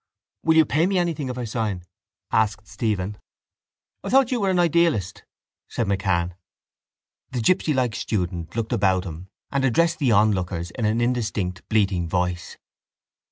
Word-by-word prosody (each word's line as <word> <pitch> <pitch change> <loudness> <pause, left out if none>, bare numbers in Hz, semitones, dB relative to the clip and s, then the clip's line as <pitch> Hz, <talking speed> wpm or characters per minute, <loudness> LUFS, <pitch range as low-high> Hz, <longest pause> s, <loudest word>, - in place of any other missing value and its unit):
—Will 160 0 +3
you 160 - +7
pay 155 +6 +2
me 195 -1 +1
anything 165 -6 -1
if 125 - -5
I 125 - -3
sign? 110 -5 -2 0.5
asked 110 -2 +1
Stephen. 105 -3 -2 0.8
—I - - -4
thought 265 -1 +4
you 245 -3 0
were 195 - +2
an 185 - +1
idealist, 170 - +2 0.5
said 115 - -1
MacCann. 95 -3 0 1.0
The 125 - -3
gipsylike 130 -3 +2
student 90 -6 -3
looked 115 -1 -2
about 95 -2 +2
him 85 +1 -8 0.2
and 140 -1 0
addressed 160 +6 +2
the 135 -6 +2
onlookers 95 -5 +1
in 110 - -3
an 110 +2 +1
indistinct 105 -7 -1
bleating 95 -6 +1
voice. 90 0 -2
110 Hz, 150 wpm, -23 LUFS, 95-145 Hz, 1.0 s, you